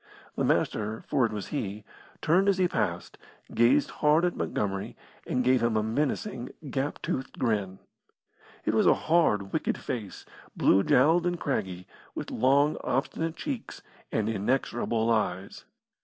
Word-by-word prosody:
The - - -1
Master, 110 +1 0
for 130 -5 +2
it - - -9
was 105 -2 -5
he, 105 -7 -4 0.4
turned 185 +5 +4
as 195 - +2
he 185 -1 +3
passed, - - -3 0.3
gazed 130 +5 +3
hard 155 +3 +4
at 175 - -1
Montgomery, 100 -1 -3 0.3
and 125 - 0
gave 130 0 +3
him 115 -2 +1
a 105 - +1
menacing, 130 - -2 0.2
gap 140 +1 -2
toothed 130 - -3
grin. 100 -6 -1 0.9
It - - +1
was - - +3
a - - +6
hard, 105 -13 +1
wicked - - 0
face, 110 -6 -6 0.3
blue 95 - +4
jowled 160 - +4
and 175 -1 -1
craggy, 95 -11 -3 0.3
with - - -5
long, 140 +5 +3
obstinate 160 +5 -1
cheeks 270 -6 -6 0.3
and 110 -1 0
inexorable 115 +1 0
eyes. 100 -4 -2
125 Hz, 145 wpm, -28 LUFS, 105-150 Hz, 0.9 s, a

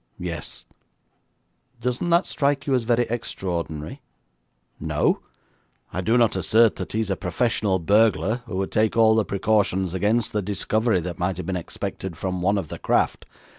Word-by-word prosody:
'Yes.' 85 -4 -6 1.1
'Doesn't 125 +8 -1
that 170 +2 +4
strike 140 -1 0
you 140 - 0
as 125 -3 +1
very 120 +1 +3
extraordinary?' 90 - -4 0.8
'No. - - +1 0.7
I 90 - -1
do 115 +6 +2
not 115 -3 +3
assert 115 0 +3
that - - -6
he 110 - +1
is 105 -3 -2
a - - +1
professional 100 +1 0
burglar, 105 +4 +3
who 100 -5 -4
would 95 0 -2
take 110 +1 +1
all 110 -1 +6
the 110 0 +3
precautions 100 -3 +1
against 105 +5 +1
the 105 - +1
discovery 105 +1 0
that 85 +1 -6
might 90 0 -1
have 90 - -5
been 95 - -2
expected 90 0 -5
from 95 -1 -3
one 100 +3 +2
of 90 -6 -3
the - - -7
craft. - - 0
105 Hz, 170 wpm, -24 LUFS, 90-115 Hz, 1.1 s, all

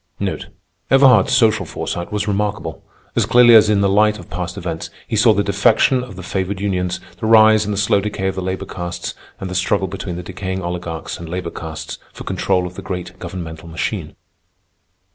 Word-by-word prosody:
Everhard's 130 -7 +6
social 110 -2 +4
foresight 85 +4 -5
was 105 0 -2
remarkable. 100 -5 -2 0.3
As - - +2
clearly 120 -1 +7
as 110 -1 +7
in 105 -2 +3
the 100 - +3
light 105 +2 +3
of 90 - -13
past 90 +1 -4
events, 85 -4 -4 0.2
he - - -2
saw 110 +2 +5
the 100 -1 +2
defection 110 +6 +3
of 125 -6 -9
the 95 - -8
favored 95 +1 -2
unions, 90 -3 -1 0.2
the 110 - -2
rise 110 -1 +6
and 105 - -2
the 100 - -2
slow 100 0 +2
decay 100 -1 -3
of 95 - +1
the 95 - -4
labor 95 +1 -3
castes, 90 -1 -5 0.3
and 95 - -4
the 90 - -5
struggle 95 +1 +1
between 95 -1 -5
the 90 - -6
decaying 95 +1 -4
oligarchs 85 -2 -5
and 85 -1 -8
labor 90 -1 -4
castes 80 -1 -7
for - - -9
control 90 -2 0
of 90 - -6
the 95 - -8
great 90 -2 -6
governmental 80 -2 -7
machine. 80 0 -4
95 Hz, 195 wpm, -19 LUFS, 90-105 Hz, 0.3 s, clearly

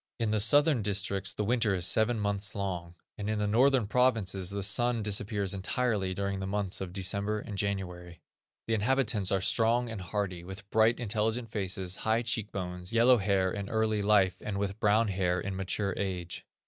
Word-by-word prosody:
In 115 -2 0
the 110 - +2
southern 145 +4 +4
districts 100 -1 0
the 105 - -3
winter 115 -2 +2
is 90 -2 +2
seven 110 +3 +2
months 100 +1 -2
long, 90 -4 -4 0.2
and 105 +1 -3
in 110 - 0
the 105 - 0
northern 125 +3 +3
provinces 105 -6 +1
the 100 0 -3
sun 115 +3 +1
disappears 100 -1 -1
entirely 100 -1 -1
during 100 0 -2
the 95 - -4
months 100 -1 -2
of 95 -2 -5
December 100 +3 -2
and 105 -1 -6
January. 90 -3 -4 0.5
The 115 - -1
inhabitants 110 -3 +1
are 95 - +1
strong 115 +4 +2
and 110 -4 -6
hardy, 90 -2 -3
with 95 +2 -9
bright, 110 +2 +3
intelligent 110 +1 -1
faces, 95 -3 -2
high 110 +2 0
cheek 110 -2 -2
bones, 90 0 -4
yellow 120 +2 +5
hair 95 -2 +1
in 100 0 -5
early 110 -1 0
life, 100 -3 +3
and 100 -2 -4
with 100 +1 -3
brown 105 +1 +3
hair 90 -2 0
in 100 -1 -4
mature 95 +1 -2
age. 90 -3 -4
100 Hz, 185 wpm, -30 LUFS, 95-110 Hz, 0.5 s, yellow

